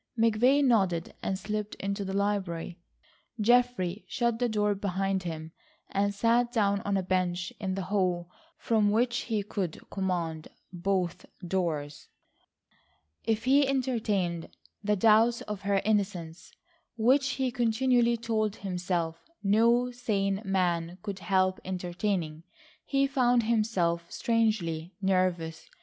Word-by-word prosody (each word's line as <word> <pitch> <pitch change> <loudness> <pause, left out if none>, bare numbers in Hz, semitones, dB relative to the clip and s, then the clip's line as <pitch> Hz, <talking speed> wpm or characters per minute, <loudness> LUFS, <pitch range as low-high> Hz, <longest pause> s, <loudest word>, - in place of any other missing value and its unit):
McVay 230 +5 +4
nodded 190 -10 +2
and 190 - -1
slipped 210 +1 -4
into 200 +1 -3
the 190 - -4
library. 190 -4 -2 0.6
Geoffrey 225 -4 +2
shut 235 -2 0
the 245 -1 +1
door 210 -1 +1
behind 195 -1 -1
him, 160 -2 -6 0.4
and 200 +1 +1
sat 235 +4 +2
down 200 -4 +1
on 200 -1 0
a 190 - -1
bench 180 -1 -1
in 190 -3 -2
the 195 - -3
hall 180 -3 0 0.3
from 215 -3 +2
which 240 +3 +2
he 215 -2 0
could 195 -5 -4
command 170 -5 -2 0.3
both 180 -1 -1 0.2
doors. 160 -5 -2 1.2
If 225 -1 0
he 275 +2 +4
entertained 215 -10 -1 0.3
the 210 0 +2
doubts 225 +3 +4
of 210 -2 -6
her 200 0 +1
innocence 190 -6 -1 0.5
which 265 +4 +3
he 260 -2 -1
continually 240 0 +2
told 220 -2 -1
himself 180 -4 -3 0.2
no 235 +5 +3
sane 200 -5 -1
man 180 -3 0
could 200 -3 -5
help 185 -1 +1
entertaining, 180 -3 -2 0.4
he 275 -1 +2
found 250 -3 +2
himself 190 -7 0
strangely 200 -8 0
nervous. 185 -4 0
200 Hz, 125 wpm, -29 LUFS, 180-230 Hz, 1.2 s, McVay